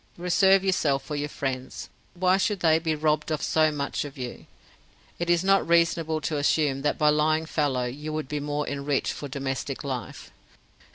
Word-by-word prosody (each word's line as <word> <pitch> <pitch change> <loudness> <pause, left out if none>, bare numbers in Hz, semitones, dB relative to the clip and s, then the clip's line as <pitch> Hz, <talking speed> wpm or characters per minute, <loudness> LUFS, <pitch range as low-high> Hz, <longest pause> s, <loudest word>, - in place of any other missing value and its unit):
Reserve 190 +2 +4
yourself 150 -8 +1
for 150 - -5
your 145 0 -2
friends. 130 -2 -4 0.3
Why 185 +1 +3
should 200 -1 0
they 160 -1 +4
be 160 -1 -1
robbed 150 0 0
of 155 - -1
so 155 -1 +3
much 140 -1 -2
of 145 -2 -9
you? 125 -2 -7 0.7
Is 175 0 +2
it - - -6
not 195 0 +3
reasonable 165 -2 +2
to 155 0 -2
assume 145 -2 +1
that 145 - 0
by 150 -1 +4
lying 155 +1 +2
fallow 145 -6 0
you 145 +5 -5
would 155 -2 -3
be 150 +1 -3
more 145 0 -3
enriched 140 -1 -1
for 145 - -6
domestic 135 0 -4
life? 130 -4 -6
150 Hz, 180 wpm, -26 LUFS, 140-165 Hz, 0.7 s, Reserve